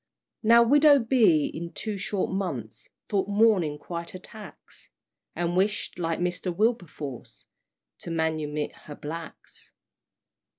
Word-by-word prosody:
Now 235 Hz, +1 st, +6 dB
widow 290 Hz, +4 st, +6 dB
B. 225 Hz, -, +4 dB
in 170 Hz, +1 st, -6 dB
two 215 Hz, -1 st, -4 dB
short 200 Hz, 0 st, -2 dB
months 170 Hz, -, -4 dB, 0.2 s
Thought 195 Hz, -2 st, 0 dB
mourning 200 Hz, -8 st, +3 dB
quite 170 Hz, +3 st, -7 dB
a -, -, -6 dB
tax; 215 Hz, +3 st, -13 dB, 0.5 s
And 175 Hz, 0 st, -1 dB
wished, 195 Hz, 0 st, 0 dB
like 165 Hz, -1 st, -1 dB
Mr. 180 Hz, +1 st, -2 dB
Wilberforce, 175 Hz, -, -3 dB, 0.5 s
To -, -, -8 dB
manumit 155 Hz, -2 st, -1 dB, 0.2 s
her 145 Hz, -, -7 dB
blacks. 160 Hz, +3 st, -9 dB
180 Hz, 120 wpm, -26 LUFS, 160-215 Hz, 0.5 s, Now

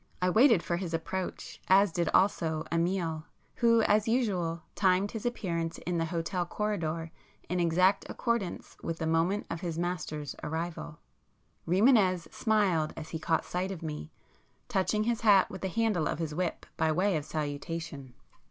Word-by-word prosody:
I 180 Hz, 0 st, +2 dB
waited 225 Hz, -3 st, +5 dB
for 170 Hz, -, -1 dB
his 175 Hz, -2 st, -3 dB
approach, 185 Hz, +3 st, -5 dB
as 195 Hz, 0 st, +5 dB
did 170 Hz, +1 st, 0 dB
also 165 Hz, -5 st, +2 dB
Amiel, 165 Hz, -2 st, 0 dB, 0.3 s
who 230 Hz, -1 st, +4 dB
as 210 Hz, +1 st, +3 dB
usual 185 Hz, -9 st, 0 dB
timed 190 Hz, +1 st, +2 dB
his 225 Hz, +1 st, -3 dB
appearance 170 Hz, -8 st, -2 dB
in 175 Hz, -1 st, 0 dB
the 165 Hz, -, +1 dB
hotel 170 Hz, +2 st, -2 dB
corridor 170 Hz, -4 st, -2 dB, 0.4 s
in 180 Hz, +1 st, 0 dB
exact 180 Hz, +3 st, +3 dB
accordance 235 Hz, -7 st, -2 dB
with 165 Hz, -, -3 dB
the 160 Hz, -, -3 dB
moment 165 Hz, +6 st, +1 dB
of 165 Hz, -, -4 dB
his 170 Hz, -3 st, -3 dB
master's 155 Hz, -4 st, -3 dB
arrival. 160 Hz, 0 st, -4 dB, 0.7 s
Rimânez 185 Hz, -, +3 dB
smiled 195 Hz, -8 st, +1 dB
as 155 Hz, -, -7 dB
he 160 Hz, -, -4 dB
caught 160 Hz, 0 st, 0 dB
sight 180 Hz, +2 st, -2 dB
of 180 Hz, -4 st, -6 dB
me, 155 Hz, -1 st, -5 dB, 0.6 s
touching 210 Hz, -1 st, +1 dB
his 235 Hz, 0 st, 0 dB
hat 205 Hz, -4 st, +5 dB
with 190 Hz, -, -7 dB
the 190 Hz, -, -1 dB
handle 205 Hz, -6 st, +1 dB
of -, -, -2 dB
his 160 Hz, -2 st, -3 dB
whip 175 Hz, +1 st, -2 dB
by 160 Hz, 0 st, +2 dB
way 185 Hz, +4 st, +2 dB
of 150 Hz, -, -1 dB
salutation. 145 Hz, -3 st, -5 dB
175 Hz, 160 wpm, -30 LUFS, 165-200 Hz, 0.7 s, waited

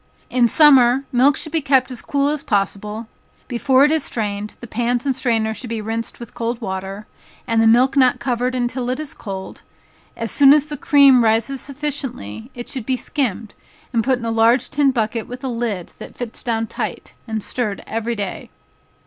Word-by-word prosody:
In 245 Hz, -1 st, +4 dB
summer, 270 Hz, -2 st, +5 dB
milk 265 Hz, +3 st, +4 dB
should 310 Hz, -, -3 dB
be 325 Hz, -1 st, +1 dB
kept 265 Hz, -2 st, +2 dB
as 245 Hz, -, -6 dB
cool 280 Hz, 0 st, 0 dB
as 300 Hz, -1 st, -2 dB
possible; 210 Hz, -3 st, -2 dB, 0.4 s
before 260 Hz, +2 st, +3 dB
it 295 Hz, -, +2 dB
is 315 Hz, -3 st, +2 dB
strained, 210 Hz, -3 st, -3 dB
the -, -, -9 dB
pans 240 Hz, +2 st, -1 dB
and 270 Hz, -2 st, +1 dB
strainer 225 Hz, -4 st, 0 dB
should 240 Hz, +2 st, -8 dB
be 230 Hz, -1 st, -3 dB
rinsed 225 Hz, +2 st, -4 dB
with 235 Hz, -2 st, -10 dB
cold 235 Hz, 0 st, -3 dB
water, 195 Hz, -1 st, -5 dB, 0.4 s
and 225 Hz, 0 st, +2 dB
the 225 Hz, -, +4 dB
milk 250 Hz, +4 st, +4 dB
not 255 Hz, -3 st, +4 dB
covered 250 Hz, 0 st, -1 dB
until 245 Hz, 0 st, -2 dB
it 255 Hz, +3 st, -2 dB
is 310 Hz, -2 st, -6 dB
cold, 190 Hz, -3 st, -7 dB, 0.6 s
as 230 Hz, -2 st, -2 dB
soon 280 Hz, -1 st, +7 dB
as 300 Hz, -1 st, +3 dB
the 295 Hz, -, -3 dB
cream 275 Hz, -3 st, +5 dB
rises 230 Hz, +4 st, +1 dB
sufficiently, 270 Hz, -, -5 dB
it 240 Hz, -1 st, -7 dB
should 260 Hz, -6 st, -5 dB
be 260 Hz, -1 st, +1 dB
skimmed, 230 Hz, -7 st, -3 dB, 0.4 s
and 230 Hz, -1 st, +2 dB
put 260 Hz, +1 st, +2 dB
in 235 Hz, -, -7 dB
a 230 Hz, -, -1 dB
large 230 Hz, +3 st, +3 dB
tin 290 Hz, -1 st, +3 dB
bucket 225 Hz, -3 st, -1 dB
with 250 Hz, +1 st, -8 dB
a -, -, -2 dB
lid 230 Hz, -7 st, -3 dB
that -, -, -10 dB
fits 245 Hz, -2 st, -6 dB
down 225 Hz, -2 st, -1 dB
tight, -, -, -5 dB
and 220 Hz, -2 st, -3 dB
stirred 215 Hz, -5 st, -3 dB
every 230 Hz, +1 st, -3 dB
day. 200 Hz, -3 st, -5 dB
240 Hz, 195 wpm, -20 LUFS, 225-270 Hz, 0.6 s, soon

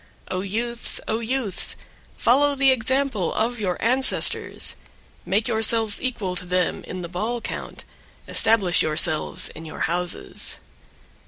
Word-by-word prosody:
10. 185 Hz, -, -1 dB
O -, -, -1 dB
youths! 230 Hz, +5 st, -2 dB
O 220 Hz, -, 0 dB
youths! 235 Hz, -4 st, 0 dB, 0.4 s
follow 285 Hz, +4 st, +3 dB
the 270 Hz, -1 st, +4 dB
example 260 Hz, -5 st, +1 dB
of 235 Hz, +2 st, 0 dB
your 185 Hz, -4 st, -1 dB
ancestors; 255 Hz, +4 st, +2 dB, 0.5 s
make 205 Hz, +4 st, +1 dB
yourselves 225 Hz, -2 st, +3 dB
equal 220 Hz, -8 st, -2 dB
to 180 Hz, -, -3 dB
them 180 Hz, -1 st, 0 dB
in 185 Hz, -, -6 dB
the 170 Hz, -, -5 dB
ball 215 Hz, +8 st, -3 dB
count; -, -, -6 dB, 0.4 s
establish 205 Hz, -6 st, +4 dB
yourselves 155 Hz, 0 st, 0 dB
in 160 Hz, -, -10 dB
your 160 Hz, -, -8 dB
houses. 175 Hz, +1 st, -2 dB
220 Hz, 135 wpm, -23 LUFS, 180-240 Hz, 0.5 s, the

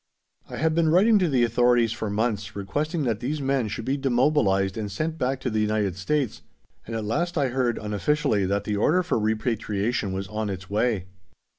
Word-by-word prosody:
I -, -, -6 dB
had 160 Hz, +1 st, +1 dB
been 165 Hz, -1 st, +2 dB
writing 205 Hz, +6 st, +5 dB
to 180 Hz, -3 st, +2 dB
the 130 Hz, -4 st, +3 dB
authorities 120 Hz, 0 st, +3 dB
for 110 Hz, -2 st, -3 dB
months, 105 Hz, -1 st, -2 dB
requesting 150 Hz, -, -2 dB
that 115 Hz, -5 st, -1 dB
these 140 Hz, +6 st, -2 dB
men 135 Hz, -4 st, 0 dB
should 110 Hz, +2 st, -5 dB
be 135 Hz, +2 st, 0 dB
demobilized 120 Hz, -8 st, +2 dB
and 105 Hz, -2 st, -4 dB
sent 155 Hz, +10 st, -3 dB
back 130 Hz, +1 st, 0 dB
to 125 Hz, -, -2 dB
the 110 Hz, -, 0 dB
United 105 Hz, -3 st, 0 dB
States, 130 Hz, +6 st, -1 dB, 0.5 s
and 115 Hz, -, -4 dB
at 110 Hz, -1 st, -3 dB
last 170 Hz, +11 st, -1 dB
I 140 Hz, -3 st, +2 dB
heard, 125 Hz, -2 st, 0 dB
unofficially, 105 Hz, 0 st, 0 dB
that 100 Hz, +1 st, 0 dB
the 105 Hz, 0 st, -2 dB
order 175 Hz, -, +3 dB
for 140 Hz, -, 0 dB
repatriation 110 Hz, -1 st, -1 dB
was 95 Hz, 0 st, -4 dB
on 105 Hz, 0 st, -3 dB
its 95 Hz, -1 st, -6 dB
way. 105 Hz, -2 st, 0 dB
115 Hz, 195 wpm, -25 LUFS, 105-140 Hz, 0.5 s, writing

